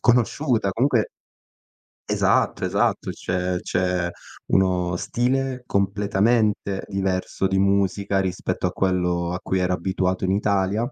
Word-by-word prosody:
conosciuta. 120 -2 +2
Comunque 120 +2 +1 1.0
Esatto, - - +2
esatto. - - 0
Cioè, 90 0 -2
c'è 90 -1 0 0.4
uno 90 -2 +2
stile 130 +6 -1
completamente 100 +1 +1
diverso 95 -1 -1
di 95 0 +1
musica 100 0 +1
rispetto 95 -1 -2
a - - +1
quello 90 -2 0
a 90 - -3
cui 95 - -1
ero 90 0 +1
abituato 95 +1 -1
in 95 - +1
Italia. 100 +3 0
95 Hz, 115 wpm, -23 LUFS, 90-105 Hz, 1.0 s, conosciuta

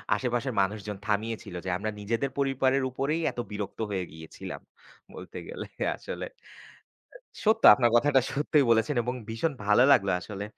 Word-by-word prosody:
আশেপাশের 125 0 -1
মানুষজন 105 +1 -3
থামিয়েছিল। 110 -2 -2
যে - - -2
আমরা 110 +3 -3
নিজেদের 115 +6 -1
পরিবারের 135 -1 +1
উপরেই 140 +6 -1
এত - - -9
বিরক্ত 105 0 -5
হয়ে 95 -2 -2
গিয়েছিলাম। 80 0 -9 0.5
বলতে - - -9
গেলে - - -6 0.3
আসলে। - - -6 1.2
সত্য 220 +1 +3
আপনার 120 -3 +2
কথাটা 135 +2 +4
সত্যই 145 0 +2
বলেছেন 115 +5 +2
এবং 125 +2 -2
ভীষণ 115 +8 -1
ভালো 105 +4 +5
লাগলো 100 -7 +4
আসলে, 100 +1 -6
120 Hz, 140 wpm, -28 LUFS, 105-135 Hz, 1.2 s, ভালো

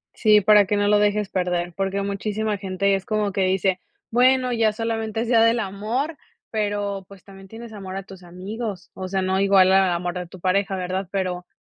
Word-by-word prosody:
Sí, 210 -1 +5
para 210 0 +6
que 205 - 0
no 205 0 +1
lo 205 0 +4
dejes 210 -1 +1
perder 180 -1 -1
porque 195 0 -1
muchísima 210 +1 -2
gente 195 0 0
es 195 -1 -1
como 210 -2 -1
que 195 - -1
dice: 185 0 +1 0.3
"Bueno, 255 +1 +3
ya 225 -2 +2
solamente 225 0 -3
es 235 - -3
día 230 -1 +4
del 230 +1 +4
amor", 225 +10 -3 0.3
pero 205 -2 -2
pues 200 -2 -15
también 195 -1 -14
tienes 225 +2 -10
amor 190 -2 -7
a 195 - -4
tus 190 -1 -13
amigos, 190 +3 -7
o 185 - -6
sea 190 0 -1
no 190 +1 0
igual 195 -1 +5
al 190 -1 +4
amor 175 0 -2
de 180 -1 -5
tu 185 - -13
pareja 195 +2 0
¿verdad? 185 +1 -3
Pero 180 -2 -3
200 Hz, 205 wpm, -23 LUFS, 190-215 Hz, 0.3 s, para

